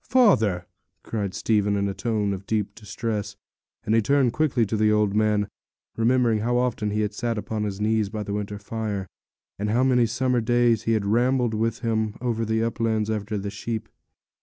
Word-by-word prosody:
'Father!' 110 Hz, -, +4 dB, 0.4 s
cried 100 Hz, -4 st, -3 dB
Stephen, 105 Hz, -2 st, +1 dB
in 100 Hz, 0 st, 0 dB
a 100 Hz, -, -2 dB
tone 105 Hz, 0 st, -1 dB
of 95 Hz, +1 st, -7 dB
deep 105 Hz, -2 st, -1 dB
distress; 105 Hz, 0 st, -4 dB, 0.5 s
and 110 Hz, -, +1 dB
he 115 Hz, -, +5 dB
turned 135 Hz, 0 st, +2 dB
quickly 140 Hz, -7 st, +2 dB
to 110 Hz, -, -2 dB
the 105 Hz, 0 st, +3 dB
old 105 Hz, -2 st, +2 dB
man, 105 Hz, -1 st, +2 dB, 0.5 s
remembering 115 Hz, -1 st, +2 dB
how 120 Hz, +3 st, +1 dB
often 120 Hz, -4 st, 0 dB
he 105 Hz, +1 st, 0 dB
had 105 Hz, 0 st, -1 dB
sat 115 Hz, +1 st, -2 dB
upon 105 Hz, +1 st, -3 dB
his 100 Hz, -1 st, -4 dB
knees 110 Hz, -1 st, +1 dB
by 105 Hz, 0 st, -4 dB
the 100 Hz, -, -4 dB
winter 105 Hz, 0 st, -3 dB
fire, 105 Hz, -2 st, -4 dB, 0.5 s
and 105 Hz, +1 st, -1 dB
how 120 Hz, +4 st, +2 dB
many 125 Hz, -3 st, +4 dB
summer 125 Hz, +1 st, +1 dB
days 120 Hz, -1 st, +2 dB
he 115 Hz, -, +2 dB
had 110 Hz, -2 st, 0 dB
rambled 120 Hz, +2 st, +2 dB
with 115 Hz, +1 st, -1 dB
him 110 Hz, -2 st, 0 dB
over 115 Hz, -2 st, -1 dB
the 110 Hz, 0 st, 0 dB
uplands 110 Hz, -2 st, 0 dB
after 105 Hz, 0 st, -2 dB
the 100 Hz, 0 st, -4 dB
sheep. 110 Hz, +2 st, -4 dB
110 Hz, 190 wpm, -25 LUFS, 105-115 Hz, 0.5 s, he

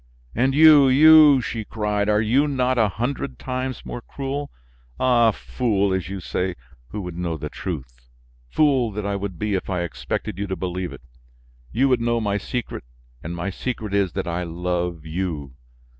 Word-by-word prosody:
"And 130 Hz, +3 st, +1 dB
you, 150 Hz, -2 st, +8 dB
you," 150 Hz, 0 st, +7 dB
she 115 Hz, -2 st, -4 dB
cried, 105 Hz, -1 st, -1 dB
"are 105 Hz, 0 st, +3 dB
you 130 Hz, +7 st, +3 dB
not 130 Hz, -3 st, +1 dB
a 110 Hz, -2 st, +3 dB
hundred 115 Hz, -, -3 dB
times 130 Hz, 0 st, -4 dB
more 120 Hz, -, -6 dB
cruel? 140 Hz, +3 st, -5 dB, 0.5 s
Ah! 120 Hz, -3 st, +4 dB
fool, 100 Hz, -3 st, 0 dB
as 95 Hz, -1 st, -2 dB
you 100 Hz, 0 st, -5 dB
say, 90 Hz, 0 st, -2 dB, 0.3 s
who 105 Hz, -, -6 dB
would 90 Hz, -2 st, -6 dB
know 85 Hz, -2 st, -3 dB
the 75 Hz, 0 st, -6 dB
truth! -, -, -7 dB, 0.4 s
Fool 135 Hz, -, +2 dB
that 105 Hz, 0 st, -4 dB
I 100 Hz, 0 st, -1 dB
would 100 Hz, -3 st, -4 dB
be 105 Hz, +2 st, -2 dB
if 95 Hz, -, -2 dB
I 90 Hz, -2 st, -1 dB
expected 85 Hz, +2 st, -4 dB
you 100 Hz, -, -2 dB
to 95 Hz, -, -2 dB
believe 90 Hz, -1 st, -4 dB
it! -, -, -11 dB, 0.7 s
You 135 Hz, +3 st, +2 dB
would 125 Hz, -2 st, +2 dB
know 120 Hz, 0 st, +1 dB
my 105 Hz, -2 st, -1 dB
secret, 125 Hz, +2 st, -5 dB, 0.4 s
and 85 Hz, +2 st, -5 dB
my 90 Hz, +3 st, -3 dB
secret 110 Hz, -1 st, -4 dB
is 100 Hz, -4 st, +1 dB
that -, -, -3 dB
I 85 Hz, +1 st, -2 dB
love 85 Hz, -1 st, -3 dB
you. 80 Hz, -5 st, -4 dB
105 Hz, 180 wpm, -23 LUFS, 90-125 Hz, 0.7 s, you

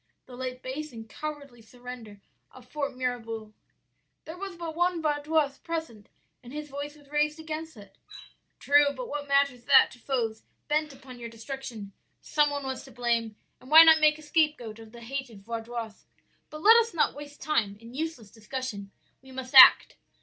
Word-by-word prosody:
"'The 250 Hz, -, -12 dB
late 255 Hz, 0 st, -6 dB
base 290 Hz, +4 st, -5 dB
and 225 Hz, -2 st, -10 dB
cowardly 285 Hz, -2 st, -8 dB
surrender 235 Hz, -3 st, -11 dB, 0.3 s
of 250 Hz, -1 st, -16 dB
Fort 280 Hz, +1 st, -4 dB
Mirabouc.' 230 Hz, -4 st, -4 dB, 0.7 s
"'There 320 Hz, -, -8 dB
was 385 Hz, 0 st, -7 dB
but 335 Hz, -2 st, -6 dB
one 350 Hz, 0 st, +1 dB
Vaudois 295 Hz, -2 st, 0 dB
present, 320 Hz, -11 st, -6 dB, 0.3 s
and 245 Hz, -, -13 dB
his 300 Hz, +1 st, -7 dB
voice 285 Hz, +1 st, -6 dB
was 290 Hz, -1 st, -20 dB
raised 300 Hz, +1 st, 0 dB
against 320 Hz, -2 st, -6 dB
it.' 200 Hz, -2 st, -15 dB, 0.6 s
"'True, 290 Hz, +1 st, +4 dB
but 255 Hz, -1 st, -6 dB
what 290 Hz, 0 st, -5 dB
matters 280 Hz, -3 st, +1 dB
that -, -, +6 dB
to 250 Hz, -, -15 dB
foes 230 Hz, -4 st, -2 dB, 0.3 s
bent 305 Hz, 0 st, 0 dB
upon 265 Hz, -2 st, -13 dB
your 235 Hz, -1 st, -7 dB
destruction? 230 Hz, -3 st, -8 dB, 0.3 s
some 295 Hz, -1 st, +1 dB
one 285 Hz, -1 st, -4 dB
was 265 Hz, -1 st, -5 dB
to 270 Hz, -, -14 dB
blame, 230 Hz, -2 st, -1 dB, 0.2 s
and 255 Hz, -, -16 dB
why 320 Hz, +2 st, +10 dB
not 320 Hz, -1 st, +6 dB
make 305 Hz, 0 st, +4 dB
a 310 Hz, -, -14 dB
scapegoat 300 Hz, -8 st, 0 dB
of 225 Hz, -1 st, -13 dB
the 235 Hz, 0 st, -13 dB
hated 240 Hz, -4 st, -6 dB
Vaudois? 230 Hz, -1 st, -6 dB, 0.4 s
But 305 Hz, +1 st, -10 dB
let 450 Hz, +2 st, +8 dB
us 460 Hz, -4 st, +1 dB
not 315 Hz, -, +2 dB
waste 290 Hz, 0 st, -11 dB
time 220 Hz, -10 st, -1 dB
in 230 Hz, +2 st, -14 dB
useless 290 Hz, -7 st, -5 dB
discussion. 220 Hz, -2 st, -6 dB, 0.3 s
We 265 Hz, 0 st, -16 dB
must 260 Hz, 0 st, -7 dB
act.' 260 Hz, -1 st, +9 dB
265 Hz, 180 wpm, -27 LUFS, 235-300 Hz, 0.7 s, why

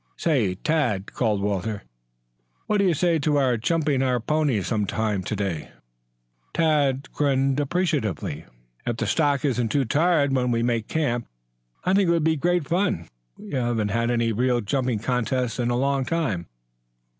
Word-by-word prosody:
"Say, 120 Hz, -, +1 dB
Tad," 120 Hz, -, -1 dB
called 105 Hz, -5 st, 0 dB
Walter, 100 Hz, 0 st, -2 dB, 0.8 s
"what 210 Hz, -, +1 dB
do 200 Hz, -, +3 dB
you 180 Hz, -, +3 dB
say 170 Hz, +1 st, +2 dB
to 150 Hz, 0 st, +1 dB
our 130 Hz, -3 st, +3 dB
jumping 145 Hz, +3 st, +1 dB
our 125 Hz, -2 st, +1 dB
ponies 140 Hz, -5 st, 0 dB
some 105 Hz, -4 st, 0 dB
time 105 Hz, -2 st, -1 dB
to 100 Hz, -, -3 dB
day?" 95 Hz, -7 st, -3 dB, 0.9 s
Tad 145 Hz, -4 st, +2 dB
grinned 135 Hz, -1 st, +1 dB
appreciatively. 145 Hz, -, -1 dB, 0.4 s
"If 120 Hz, -2 st, -2 dB
the -, -, -1 dB
stock 145 Hz, -3 st, +1 dB
isn't 120 Hz, -4 st, 0 dB
too 140 Hz, +3 st, +1 dB
tired 145 Hz, +1 st, +2 dB
when 125 Hz, -1 st, +1 dB
we 115 Hz, -1 st, +1 dB
make 115 Hz, -2 st, 0 dB
camp, 120 Hz, -7 st, -1 dB, 0.6 s
I 185 Hz, -, +1 dB
think 195 Hz, -1 st, +3 dB
it -, -, +3 dB
would 165 Hz, -2 st, +1 dB
be 160 Hz, 0 st, +3 dB
great 175 Hz, 0 st, 0 dB
fun. 175 Hz, -, 0 dB, 0.3 s
We -, -, -11 dB
haven't 120 Hz, -6 st, 0 dB
had 115 Hz, +3 st, 0 dB
any 115 Hz, -1 st, +1 dB
real 125 Hz, +2 st, +1 dB
jumping 125 Hz, +2 st, -1 dB
contests 125 Hz, +1 st, -1 dB
in 120 Hz, -1 st, +1 dB
a 120 Hz, -, +1 dB
long 135 Hz, +1 st, +1 dB
time." 125 Hz, -, -1 dB
130 Hz, 170 wpm, -24 LUFS, 110-150 Hz, 0.9 s, do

